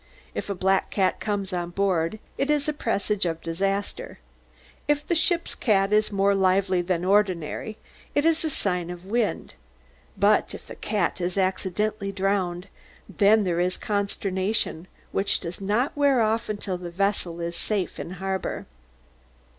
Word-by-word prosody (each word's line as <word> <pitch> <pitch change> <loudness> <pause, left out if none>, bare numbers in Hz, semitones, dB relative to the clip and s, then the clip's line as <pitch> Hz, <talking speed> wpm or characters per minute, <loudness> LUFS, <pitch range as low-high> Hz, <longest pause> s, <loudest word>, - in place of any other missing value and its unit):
If - - -4
a 200 - -1
black 190 +1 +2
cat 190 -2 +1
comes 200 -3 -2
on 175 -1 -2
board, 180 0 0 0.2
it 275 - -1
is 295 -1 +2
a 305 - +1
presage 200 -8 0
of 165 -1 -2
disaster; 195 +5 -2 0.7
if 295 0 +1
the - - 0
ship's 340 +1 +2
cat 200 -3 +2
is 215 0 +3
more 200 0 +3
lively 190 -1 +3
than 175 0 -1
ordinary, 195 0 +1 0.4
it 290 - +3
is 330 0 +3
a 320 - 0
sign 180 - -1
of 175 0 -8
wind; 220 +2 -1 0.6
but 205 +2 +3
if - - -11
the - - -9
cat 200 -4 -1
is 180 +2 -1
accidentally 195 +2 0
drowned, 190 -2 -1 0.4
then 210 +1 +4
there 175 -3 0
is 180 +1 +1
consternation, 200 -3 -1 0.2
which 195 - +1
does 175 +2 -6
not 215 +8 +1
wear 285 -3 +4
off 225 0 +1
until 200 -3 -3
the 175 -1 -6
vessel 180 -2 -1
is 170 0 -3
safe 205 -1 -2
in 175 - -5
harbour. 190 +1 -3
195 Hz, 155 wpm, -25 LUFS, 180-210 Hz, 0.7 s, then